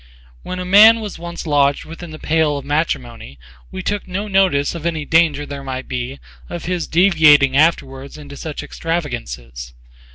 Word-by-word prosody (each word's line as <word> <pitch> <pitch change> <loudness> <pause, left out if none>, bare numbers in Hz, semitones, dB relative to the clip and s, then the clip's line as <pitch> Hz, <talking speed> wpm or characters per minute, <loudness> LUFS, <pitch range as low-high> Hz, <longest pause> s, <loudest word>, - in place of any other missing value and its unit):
When 185 - -6
a 180 - -4
man 215 +5 +7
was 210 -6 -7
once 170 0 -7
lodged 145 -2 +1
within 165 +1 -10
the 155 - -9
pale 155 -2 0
of 140 - -8
matrimony, 70 - -3 0.3
we 185 - -7
took 205 0 -3
no 195 +3 -4
notice 190 -8 +2
of 170 -3 -7
any 160 -3 -3
danger 160 -3 +2
there 140 -1 -7
might 130 -1 -6
be 125 +2 -5 0.3
of 175 -2 -6
his 180 -1 -2
deviating 155 -6 +4
afterwards 140 -3 0
into 145 -1 -11
such 150 +1 -6
extravagances. 65 - -5
155 Hz, 165 wpm, -18 LUFS, 140-175 Hz, 0.3 s, man